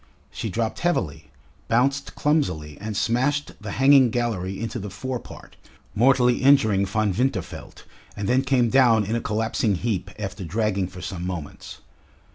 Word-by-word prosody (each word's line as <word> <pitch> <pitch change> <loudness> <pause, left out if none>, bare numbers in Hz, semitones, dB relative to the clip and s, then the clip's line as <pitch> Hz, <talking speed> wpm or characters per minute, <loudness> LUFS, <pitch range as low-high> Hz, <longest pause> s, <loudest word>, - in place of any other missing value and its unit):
She 110 - -4
dropped 110 +3 -2
heavily, 135 - -1 0.4
bounced 135 +4 +1
clumsily, 110 - 0
and 105 -1 -4
smashed 135 +7 0
the 105 - -6
hanging 135 -1 +5
gallery 110 -6 -2
into 115 +1 -4
the 105 0 -6
fore 125 +6 -4
part, - - -13 0.4
mortally 125 +2 +4
injuring 110 -8 +4
Von 105 0 0
Winterfeld, 125 +7 -3 0.3
and 100 -1 -3
then 130 +4 +3
came 130 -4 +1
down 120 -5 +4
in 110 +4 -2
a 115 - -1
collapsing 110 -1 0
heap 100 0 -2
after 100 -1 -5
dragging 100 +1 -1
for 90 0 -11
some 90 -2 -5
moments. 90 -5 -7
115 Hz, 150 wpm, -24 LUFS, 100-130 Hz, 0.4 s, hanging